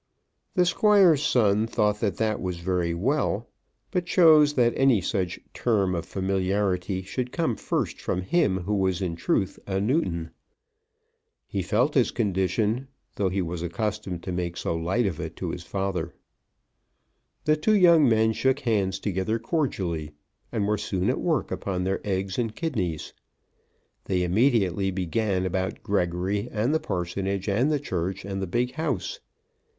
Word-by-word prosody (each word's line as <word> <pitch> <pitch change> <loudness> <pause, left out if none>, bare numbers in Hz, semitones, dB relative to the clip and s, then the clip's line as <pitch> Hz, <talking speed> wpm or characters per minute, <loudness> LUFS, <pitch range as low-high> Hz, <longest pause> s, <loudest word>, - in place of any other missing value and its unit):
The 180 -2 +4
Squire's 190 -5 +5
son 110 -6 +3
thought 105 -2 +1
that 105 -3 -1
that 110 -1 0
was 90 -2 -3
very 85 -1 -1
well, 115 - 0 0.4
but 180 -2 -1
chose 155 -5 +6
that 120 -2 +3
any 135 -5 +4
such 95 -1 -2
term 100 -6 +1
of 85 -1 -3
familiarity 95 0 -1
should 125 +6 -4
come 160 -9 0
first - - -2
from 90 - -2
him 95 - +1
who 100 +4 -2
was 95 -2 +1
in 85 -2 -2
truth 95 +3 -1
a 95 -1 0
Newton. 95 - 0 1.1
He 100 - -3
felt 120 - +1
his 130 -4 +3
condition, 105 +4 0 0.3
though 100 -2 +1
he 95 0 -1
was 85 0 -4
accustomed 95 0 -3
to 95 - -4
make 90 -1 -3
so - - -2
light 95 +9 0
of 95 -6 -2
it - - -5
to - - -4
his - - -6
father. 95 -4 -3 1.3
The 155 - +4
two 155 +8 +2
young 170 -8 +6
men 110 0 +3
shook 130 +4 +1
hands 100 -5 +1
together 100 +2 -1
cordially, 95 - -2 0.4
and 105 -3 0
were 105 -1 +1
soon 95 -3 0
at - - -3
work - - 0
upon 90 -2 -2
their 95 +1 -1
eggs 95 +1 -2
and 115 -2 -2
kidneys. 95 - -3 0.9
They 90 -2 0
immediately 95 -1 +2
began 95 +1 -1
about 95 +1 -2
Gregory 100 +3 -1
and 115 +6 0
the 160 - +2
parsonage 95 - -3
and 120 +9 +2
the 150 - +1
church, 95 - -3
and 95 -1 -4
the 95 - -2
big 120 +7 0
house. 140 - -3
100 Hz, 155 wpm, -26 LUFS, 90-120 Hz, 1.3 s, chose